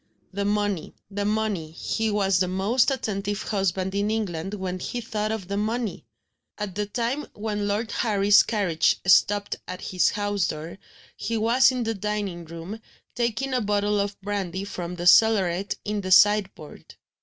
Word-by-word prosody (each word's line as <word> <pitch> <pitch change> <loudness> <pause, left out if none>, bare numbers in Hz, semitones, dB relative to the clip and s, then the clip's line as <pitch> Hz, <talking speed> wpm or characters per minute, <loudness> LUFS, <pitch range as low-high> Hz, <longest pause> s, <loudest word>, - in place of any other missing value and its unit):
The 200 +1 -2
money, 205 -4 -1 0.2
the 200 +1 -2
money 210 -6 -1
he 220 +7 -2
was 195 -3 +2
the 185 - +2
most 200 +8 +2
attentive 205 -6 -2
husband 190 -2 -1
in 200 +1 0
England 195 -4 -2
when 185 -2 -4
he 245 - -4
thought 215 -2 -2
of 220 -5 -4
the 200 +1 -2
money! 220 +1 -2 0.5
At 210 -3 -4
the 210 +2 -2
time 240 +7 -2
when 210 -1 -2
Lord 215 +3 -1
Harry's 205 -2 +4
carriage 190 -8 +1
stopped 200 +2 +3
at 185 0 -6
his 180 -1 +1
house 205 -3 -1
door, 160 +5 -6 0.4
he 230 0 -2
was 235 +4 +4
in 250 -2 -2
the 225 0 -1
dining 205 -4 -3
room, 170 +7 -8 0.3
taking 240 +3 -1
a 250 - +1
bottle 205 0 +1
of 200 0 -2
brandy 195 -2 -3
from 180 -3 -5
the 175 0 -5
cellaret 195 -2 +4
in 210 0 -2
the 185 - -5
sideboard. 195 -5 +3
205 Hz, 165 wpm, -25 LUFS, 190-215 Hz, 0.5 s, Harry's